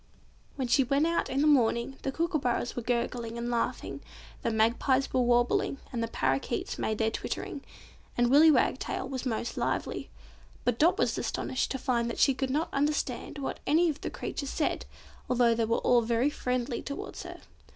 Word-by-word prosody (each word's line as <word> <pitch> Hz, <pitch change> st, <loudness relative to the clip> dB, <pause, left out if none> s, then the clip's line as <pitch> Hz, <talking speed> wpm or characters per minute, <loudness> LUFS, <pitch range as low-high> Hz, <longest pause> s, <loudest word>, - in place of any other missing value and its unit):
When 265 Hz, -3 st, -2 dB
she 270 Hz, +3 st, +4 dB
went 275 Hz, +4 st, +2 dB
out 335 Hz, 0 st, 0 dB
in 270 Hz, +2 st, 0 dB
the -, -, +3 dB
morning, 250 Hz, -2 st, +2 dB
the 270 Hz, -, -2 dB
kookooburras 300 Hz, -7 st, -1 dB
were 245 Hz, -, -2 dB
gurgling 235 Hz, -1 st, -2 dB
and 240 Hz, +1 st, -3 dB
laughing, 235 Hz, -1 st, -2 dB, 0.4 s
the -, -, 0 dB
magpies 235 Hz, +5 st, +2 dB
were 255 Hz, -, +3 dB
warbling, 240 Hz, +2 st, +2 dB, 0.2 s
the 230 Hz, -1 st, -1 dB
parrakeets 135 Hz, -10 st, -1 dB
made 220 Hz, -, -1 dB
their 220 Hz, 0 st, +1 dB
twittering, 280 Hz, -, -4 dB, 0.6 s
and 240 Hz, 0 st, +3 dB
Willy 305 Hz, +4 st, +8 dB
Wagtail 265 Hz, -2 st, +1 dB
was 260 Hz, -1 st, -4 dB
most 235 Hz, 0 st, -3 dB
lively; -, -, -2 dB, 0.6 s
but 245 Hz, -1 st, +1 dB
Dot 345 Hz, +5 st, +4 dB
was -, -, +1 dB
astonished 260 Hz, -, -2 dB
to 265 Hz, -, -2 dB
find 240 Hz, -3 st, 0 dB
that -, -, -4 dB
she 275 Hz, -, +5 dB
could 265 Hz, 0 st, -2 dB
not 300 Hz, +5 st, -1 dB
understand 285 Hz, -2 st, -1 dB
what 275 Hz, -, -4 dB
any 325 Hz, +3 st, +4 dB
of 295 Hz, -, -10 dB
the -, -, -3 dB
creatures 280 Hz, -, -5 dB
said, 300 Hz, -, -1 dB, 0.4 s
although 240 Hz, -2 st, +4 dB
they 230 Hz, 0 st, +1 dB
were 230 Hz, +1 st, +1 dB
all 245 Hz, -1 st, +4 dB
very 235 Hz, +5 st, +1 dB
friendly 250 Hz, -2 st, -2 dB
towards 280 Hz, -, -6 dB
her. -, -, -9 dB
250 Hz, 180 wpm, -29 LUFS, 235-280 Hz, 0.6 s, Willy